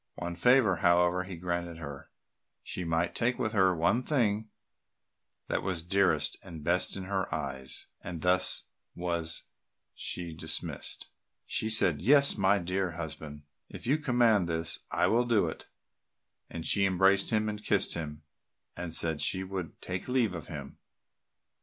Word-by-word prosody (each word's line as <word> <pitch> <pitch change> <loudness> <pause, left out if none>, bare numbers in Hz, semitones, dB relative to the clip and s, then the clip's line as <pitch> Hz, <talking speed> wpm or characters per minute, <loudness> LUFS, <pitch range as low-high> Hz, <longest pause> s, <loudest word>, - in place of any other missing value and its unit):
One 85 0 -4
favour, 115 -1 +4
however, 90 +1 +3
he 95 -2 -7
granted 85 -1 -3
her; 70 -4 -8 0.5
she 90 - -4
might 85 +1 0
take 120 +2 +1
with 110 -4 -1
her 95 -4 +4
the 90 - 0
one 90 +9 +2
thing 110 -6 0 1.0
that - - -1
was 90 -4 -2
dearest 85 -5 +2
and 85 -5 -10
best 85 +4 +1
in 95 - -5
her 95 0 -2
eyes; 65 -1 -2 0.2
and 85 -2 -6
thus 90 0 +2 0.3
was 85 -2 -1 0.5
she 85 -2 -4
dismissed. 80 - -4 0.4
She 110 - -1
said, 90 -9 +3
"Yes, 140 +7 +6
my 100 0 +3
dear 90 0 -2
husband, 80 -3 -7 0.3
if - - -9
you 145 +6 +2
command 120 - +3
this, 80 0 0
I 85 +1 +1
will 115 +6 +3
do 115 -6 +3
it," 80 - -7 0.8
and 80 -1 -6
she 100 -1 +4
embraced 95 +1 +3
him 110 -1 +1
and 105 0 -4
kissed 100 -2 +2
him, 75 -2 -5 0.5
and 85 -2 -5
said 80 -3 0
she 95 +5 +2
would 95 -4 -6
take 90 0 -4
leave 125 -6 +1
of 85 -5 -7
him. - - -8
90 Hz, 155 wpm, -30 LUFS, 85-105 Hz, 1.0 s, Yes